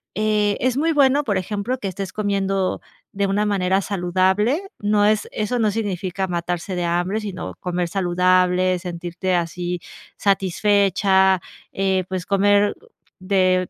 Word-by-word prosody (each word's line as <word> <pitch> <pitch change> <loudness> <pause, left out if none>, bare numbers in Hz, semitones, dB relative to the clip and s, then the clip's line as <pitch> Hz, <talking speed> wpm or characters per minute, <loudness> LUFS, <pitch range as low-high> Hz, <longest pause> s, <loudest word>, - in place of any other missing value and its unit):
eh, 210 -1 +1
es 255 0 0
muy 325 +3 +2
bueno, 280 0 +4
por 205 -8 0
ejemplo, 205 +6 -2
que 205 - -5
estés 190 +1 -5
comiendo 195 -2 -1 0.3
de 200 0 0
una 205 +2 +1
manera 190 -2 +1
saludable. 190 - +1 0.2
No 205 0 +2
es, 215 0 +2
eso 215 +3 -2
no 215 -2 +2
significa 190 -3 -2
matarse 175 +1 -3
de 180 - -2
hambre, 175 +5 0
sino 195 -4 -6
comer 180 -1 -2
saludable, 180 0 +2
sentirte 175 +1 -3
así 175 +1 -2 0.4
satisfecha, 195 -1 +2 0.3
eh, 190 -1 0
pues, 185 -2 -3
comer 205 +1 +3 0.4
de 185 -1 +1
195 Hz, 135 wpm, -21 LUFS, 180-205 Hz, 0.4 s, bueno